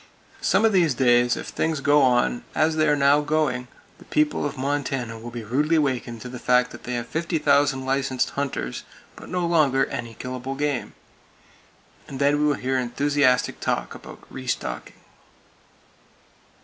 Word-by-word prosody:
Some 195 Hz, +4 st, +3 dB
of 220 Hz, -, +3 dB
these 170 Hz, -8 st, +3 dB
days, 120 Hz, -1 st, +3 dB
if -, -, -6 dB
things 160 Hz, -2 st, -1 dB
go 145 Hz, +1 st, +4 dB
on 125 Hz, -2 st, +2 dB
as 155 Hz, 0 st, +2 dB
they 155 Hz, 0 st, +2 dB
are 150 Hz, -, +4 dB
now 140 Hz, +1 st, +4 dB
going, 145 Hz, -5 st, 0 dB, 0.3 s
the -, -, -16 dB
people 150 Hz, -1 st, +1 dB
of 145 Hz, -, -8 dB
Montana 135 Hz, -4 st, -2 dB
will 120 Hz, +1 st, -8 dB
be 120 Hz, -1 st, -7 dB
rudely 145 Hz, +9 st, +1 dB
awakened 125 Hz, -6 st, -1 dB
to 125 Hz, -, -7 dB
the 125 Hz, 0 st, -8 dB
fact 125 Hz, +1 st, +2 dB
that -, -, -11 dB
they 125 Hz, -, -4 dB
have 120 Hz, -1 st, -3 dB
50,000 145 Hz, -3 st, +1 dB
licensed 135 Hz, -1 st, 0 dB
hunters 125 Hz, -, -3 dB, 0.3 s
but -, -, -12 dB
no 180 Hz, -1 st, -1 dB
longer 150 Hz, -6 st, +3 dB
any 115 Hz, -1 st, -6 dB
killable 130 Hz, +1 st, -6 dB
game! 145 Hz, -2 st, -2 dB, 1.1 s
And 135 Hz, -, -7 dB
then 145 Hz, +2 st, +2 dB
we 150 Hz, -, +2 dB
will 145 Hz, -, +2 dB
hear 130 Hz, 0 st, -1 dB
enthusiastic 130 Hz, +1 st, +1 dB
talk -, -, -2 dB
about -, -, -12 dB
"restocking." 130 Hz, -2 st, -5 dB
135 Hz, 160 wpm, -24 LUFS, 125-150 Hz, 1.1 s, go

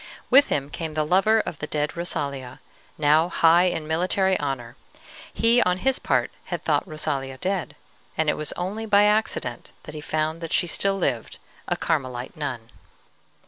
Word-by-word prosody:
With 275 Hz, +3 st, +7 dB
him 140 Hz, 0 st, -1 dB
came 160 Hz, 0 st, -4 dB
the 155 Hz, -1 st, +1 dB
lover 205 Hz, +7 st, +4 dB
of 155 Hz, -, -6 dB
the 150 Hz, -, -4 dB
dead 150 Hz, 0 st, -2 dB
Rosalia, 140 Hz, -7 st, -3 dB, 0.4 s
now 155 Hz, +3 st, +4 dB
high 170 Hz, +1 st, +5 dB
in 170 Hz, -3 st, -1 dB
military 185 Hz, +4 st, +1 dB
honor. 135 Hz, -5 st, -4 dB, 0.6 s
He 230 Hz, +2 st, +3 dB
on 180 Hz, 0 st, +2 dB
his 265 Hz, +6 st, 0 dB
part -, -, 0 dB
had -, -, -4 dB
thought -, -, +1 dB
Rosalia 135 Hz, -3 st, -3 dB
dead, 180 Hz, -3 st, -2 dB, 0.4 s
and 160 Hz, -, +1 dB
it 150 Hz, -, +4 dB
was 155 Hz, -1 st, -4 dB
only 205 Hz, +5 st, -4 dB
by 205 Hz, -1 st, +5 dB
accident 210 Hz, -, 0 dB
that -, -, -9 dB
he 155 Hz, -, -7 dB
found 155 Hz, +2 st, -2 dB
that 165 Hz, -1 st, -4 dB
she -, -, +3 dB
still 195 Hz, +3 st, 0 dB
lived, 130 Hz, -, -2 dB, 0.3 s
a -, -, 0 dB
Carmelite 130 Hz, -5 st, -2 dB
nun. 130 Hz, -7 st, -5 dB
160 Hz, 170 wpm, -24 LUFS, 145-185 Hz, 0.6 s, With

